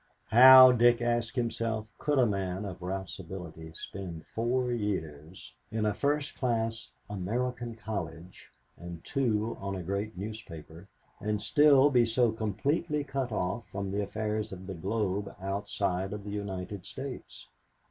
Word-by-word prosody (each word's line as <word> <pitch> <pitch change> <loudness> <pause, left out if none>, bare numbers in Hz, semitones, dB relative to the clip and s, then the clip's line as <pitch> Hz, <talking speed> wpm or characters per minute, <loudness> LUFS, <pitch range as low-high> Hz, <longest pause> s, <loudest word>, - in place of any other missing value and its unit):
How, 130 +2 +10
Dick 120 -1 +5
asked 120 0 0
himself, 115 -3 -2
could 150 -1 0
a 130 - +5
man 95 -2 -2
of 95 -2 -7
Ralph's 95 +1 -4
ability 85 -3 -8
spend 85 -2 -7
four 125 +2 -1
years 90 -7 -4 0.2
in 110 -1 -1
a 105 - +2
first 145 +5 0
class 115 -2 -1 0.2
American 120 +5 -3
college 90 -6 -6 0.3
and 85 -1 -9
two 115 -5 0
on 100 0 -3
a 90 - -5
great 100 +3 -3
newspaper 95 -4 -8 0.3
and 105 0 -1
still 145 +1 +5
be 120 -3 +4
so 115 0 +3
completely 140 - -1
cut 135 -3 -3
off 100 +3 -2
from 100 0 -4
the 100 +1 -1
affairs 110 +1 -2
of 95 -1 -8
the 95 - -5
globe 100 +2 -2
outside 95 -1 -2
of 105 -1 -6
the 105 - -6
United 100 -2 -5
States? 130 - -8
105 Hz, 145 wpm, -30 LUFS, 95-120 Hz, 0.3 s, How